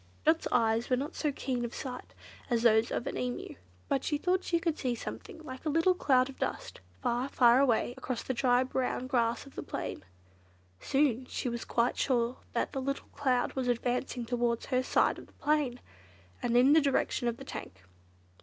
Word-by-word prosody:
Dot's 320 +1 +3
eyes 225 -1 +2
were 255 - +4
not 280 +4 -3
so 300 - -1
keen 255 -3 -2
of 235 - -4
sight 250 -3 -7 0.3
as 235 -2 +1
those 220 -1 +5
of 240 - -2
an - - -3
Emu; 250 -1 -3 0.3
but 270 -1 0
she 295 - 0
thought 365 +4 +1
she 340 - +1
could 330 -2 0
see 250 -3 0
something 325 - -8
like 260 -4 -8
a 315 - -1
little 330 +5 +4
cloud 260 -7 +3
of 270 - -11
dust, - - -3 0.2
far, 245 +2 0
far 245 -2 +5
away 245 -3 +2
across 255 -2 -4
the 260 - -2
dry 245 0 +3
brown 255 -1 -2
grass 240 -2 0
of 275 - -14
the - - -5
plain. - - -5 0.8
Soon 260 - +1
she - - -3
was 235 -1 -4
quite 235 +1 +1
sure 245 -2 +1 0.2
that - - 0
the 270 - -3
little 275 +1 -3
cloud 255 -3 +1
was 260 -2 -2
advancing 245 0 -1
towards 240 -1 0
her 255 -1 +1
side 255 - +2
of - - -12
the - - -23
plain, 290 -5 0 0.6
and 240 0 +2
in 260 +4 +6
the 320 - +6
direction 275 -3 +1
of 235 0 -1
the 270 - -10
tank. 95 - -8
255 Hz, 200 wpm, -31 LUFS, 240-275 Hz, 0.8 s, in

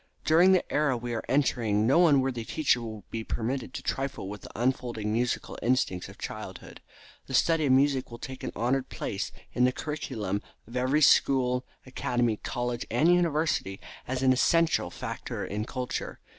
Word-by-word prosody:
During 170 +4 +6
the 185 - +3
era 145 -4 +2
we 120 0 -4
are 115 - -3
entering 115 -6 +2
no 170 +8 +5
unworthy 135 -5 +2
teacher 130 -1 +1
will 110 -2 -7
be 115 -1 -3
permitted 125 +4 -3
to - - -5
trifle 135 -7 -3
with 105 +1 -7
the - - -10
unfolding 120 -4 -1
musical 120 +2 -1
instincts 120 -7 0
of - - -13
childhood. - - -8 0.5
The 135 - -2
study 160 +1 +3
of - - +3
music 135 0 +3
will 120 - -8
take 130 +2 -8
an - - -3
honored 125 +4 0
place - - -4 0.2
in 125 - +2
the 125 - +5
curriculum 115 -10 -3 0.2
of 115 - -12
every 130 +5 +2
school, 125 -2 +4 0.2
academy, 120 -3 0
college 120 +1 -3
and 170 +3 +4
university, 160 - +1 0.3
as 130 +1 -2
an 130 -1 +5
essential 165 +5 +2
factor - - -5
in 105 +2 -3
culture. 125 0 -4
125 Hz, 170 wpm, -28 LUFS, 115-140 Hz, 0.5 s, During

